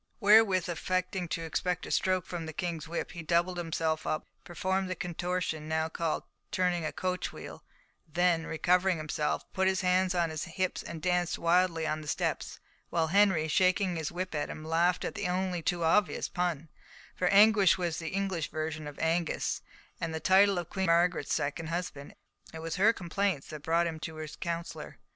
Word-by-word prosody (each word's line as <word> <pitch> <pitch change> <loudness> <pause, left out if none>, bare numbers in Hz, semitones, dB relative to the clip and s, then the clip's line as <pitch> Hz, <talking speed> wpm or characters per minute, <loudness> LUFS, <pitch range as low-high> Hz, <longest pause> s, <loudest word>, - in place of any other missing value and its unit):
Wherewith, 205 -4 +5
affecting 185 +1 -2
to 165 0 -3
expect 180 +2 -2
a - - -7
stroke 185 -2 +1
from 170 -2 -5
the 160 - -6
King's 165 -2 -3
whip, 170 - -4
he 170 - -7
doubled 170 +2 +1
himself 160 -1 -1
up, 155 - -1 0.2
performed 190 +1 -1
the 185 - -2
contortion 175 -3 -3
now 160 0 0
called 165 -1 -2 0.3
turning 180 -3 0
a 155 - -2
coachwheel, 185 0 -4 0.5
then, 170 -1 +2
recovering 180 +2 +2
himself, 155 -1 -2
put 190 0 +2
his 190 -1 +1
hands 185 0 +2
on 170 -2 +1
his 155 +2 -4
hips 185 +2 -2
and 160 -2 -8
danced 180 -1 +1
wildly 170 -1 +2
on 155 0 -1
the 150 - -10
steps; - - -2 0.3
while 165 -2 +1
Henry, 190 -4 +4
shaking 185 +2 +2
his 160 -2 -3
whip 180 +1 -4
at 150 -1 -2
him, 155 - -7
laughed 170 +3 +2
at - - -3
the - - -2
only 180 -1 -1
too 170 +1 -1
obvious 180 +4 +2
pun, 170 -3 -2 0.5
for 180 - 0
Anguish 200 0 +6
was 175 -3 -2
the 165 -1 -4
English 190 -4 -2
version 155 -1 -4
of 145 - -9
Angus, 165 +1 0 0.4
the 160 -1 -3
title 195 +2 +5
of 175 -1 -4
Queen 190 -2 -1
Margaret's 170 -2 +2
second 145 +3 -2
husband, 165 -4 -5 0.3
and - - -14
it 160 - -6
was 165 +3 -3
her 210 +4 +6
complaints 190 -5 -2
that 155 - -6
had - - -16
brought 165 +3 +2
him 165 -2 -3
to 160 0 -6
his 155 -1 -7
counsellor. 170 -1 -5
175 Hz, 185 wpm, -30 LUFS, 160-185 Hz, 0.5 s, Anguish